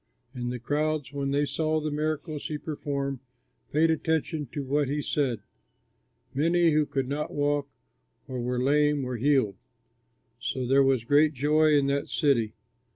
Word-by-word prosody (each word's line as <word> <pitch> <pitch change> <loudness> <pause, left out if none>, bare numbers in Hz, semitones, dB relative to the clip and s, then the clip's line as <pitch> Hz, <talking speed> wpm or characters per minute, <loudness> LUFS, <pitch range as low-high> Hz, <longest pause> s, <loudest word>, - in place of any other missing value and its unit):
And 120 -2 -3
the 125 - -3
crowds, 145 +2 -1
when 140 -1 -2
they 145 +1 +2
saw 155 +1 0
the 155 0 -3
miracles 155 0 -2
he 150 - -3
performed, 140 -3 -3 0.5
paid 160 +2 +3
attention 160 -2 -1
to 140 +4 -5
what 140 +1 0
he 145 +3 -1
said. 135 -6 -1 0.9
Many 165 +4 +3
who 150 -1 +2
could 135 -2 -2
not 145 +2 -3
walk 145 -1 0 0.6
or 130 -1 -4
were 125 +1 -1
lame 145 +2 +2
were 125 -1 -3
healed. 130 -6 +2 0.8
So 130 0 -2
there 135 +3 +4
was 135 -4 +3
great 145 +5 +4
joy 150 +3 +3
in 145 -2 +4
that 140 0 -1
city. 120 -7 +1
145 Hz, 155 wpm, -27 LUFS, 135-150 Hz, 0.9 s, there